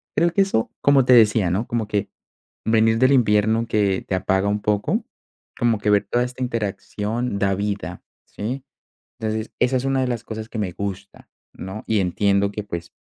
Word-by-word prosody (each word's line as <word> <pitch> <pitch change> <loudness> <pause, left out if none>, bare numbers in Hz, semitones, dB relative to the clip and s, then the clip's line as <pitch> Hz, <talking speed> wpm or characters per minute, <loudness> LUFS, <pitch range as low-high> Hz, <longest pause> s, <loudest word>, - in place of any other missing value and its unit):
Creo 170 0 +3
que 200 - +3
eso 195 -13 0
como 140 -2 +4
te 130 - +5
decía, 110 -5 +5
¿no?, 105 +6 -1
como 115 -3 -2
que, 105 -2 -1 0.6
venir 110 0 +3
del 130 +1 +5
invierno 110 -2 +3
que 100 -4 +1
te 95 - 0
apaga 95 +1 +1
un 105 0 -1
poco, 105 -1 0 0.5
como 115 -3 +1
que 105 - 0
ver 105 0 +3
toda 120 - +2
esta 125 +1 -8
interacción 110 0 -3
da 100 -1 +1
vida, 100 -3 -4 0.2
¿sí? 125 +6 -5 0.6
Entonces 110 0 -3
esa 130 +1 +2
es 125 - -3
una 135 -1 +1
de 130 - 0
las 120 -2 -3
cosas 110 -1 -6
que 110 - -5
me 100 -4 -1
gusta, 100 0 -6 0.3
¿no? 95 +4 -7
Y 110 -2 +2
entiendo 100 +2 +1
que 105 +1 -5
pues, 85 -4 -7
110 Hz, 190 wpm, -22 LUFS, 100-120 Hz, 0.6 s, te